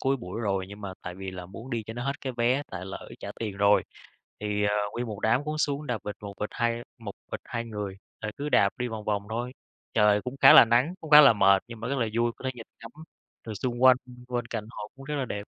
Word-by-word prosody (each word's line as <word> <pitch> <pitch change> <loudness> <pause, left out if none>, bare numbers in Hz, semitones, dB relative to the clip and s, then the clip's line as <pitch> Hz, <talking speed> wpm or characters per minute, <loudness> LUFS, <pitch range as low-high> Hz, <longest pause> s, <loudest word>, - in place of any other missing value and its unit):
cuối 135 +1 +1
buổi 105 -2 -6
rồi 95 -4 -1
nhưng 100 +1 -10
mà 100 -2 -5
tại 90 0 -6
vì 95 0 -6
là 90 -1 -8
muốn 115 +8 -10
đi 115 -2 -2
cho 110 - -6
nó 120 +1 -4
hết 140 0 -2
cái 130 - -4
vé 125 +4 +2
tại 95 -1 -6
lỡ 95 0 -8
trả - - -6
tiền 105 -4 -3
rồi, 100 0 +4 0.6
thì, 105 0 -1
ờ, 105 - +2 0.2
nguyên 120 +1 -3
một 105 -3 -6
đám 120 +6 +2
cũng 155 +1 -3
xuống 145 0 -1
đạp 125 -4 -1
vịt 105 -1 -5
một 100 -1 -6
vịt 105 - -2
hai 120 -1 -1 0.2
một 105 -3 -7 0.2
vịt - - -3
2 115 -1 -4
người, 105 -4 -5 0.3
rồi 110 0 -3
cứ 145 +1 -3
đạp 100 - +5
đi 125 - -1
vòng 110 -2 -6
vòng 105 -1 0
thôi, 120 +3 -3 0.4
trời 105 -1 +4
cũng 125 +1 -5
khá - - +10
là - - +10
nắng, 120 +9 +2
cũng 160 - -9
khá 150 0 +11
là 140 -4 +8
mệt, 100 -2 +4
nhưng 115 -2 -9
mà 115 - -4
rất 140 - -1
là 115 - +1
vui, 120 0 +2
có - - -14
thể 130 - 0
nhìn 115 -2 -10
ngắm 115 - -9 0.6
trời 110 - -4
xung 120 +3 -3
quanh, 130 -1 +8 0.3
bên 120 -1 -2
cạnh 115 -2 -4
hồ 105 - -7
cũng 135 - -11
rất 150 +2 -4
là 135 - -1
đẹp. 100 -4 -5
115 Hz, 275 wpm, -27 LUFS, 105-125 Hz, 0.6 s, khá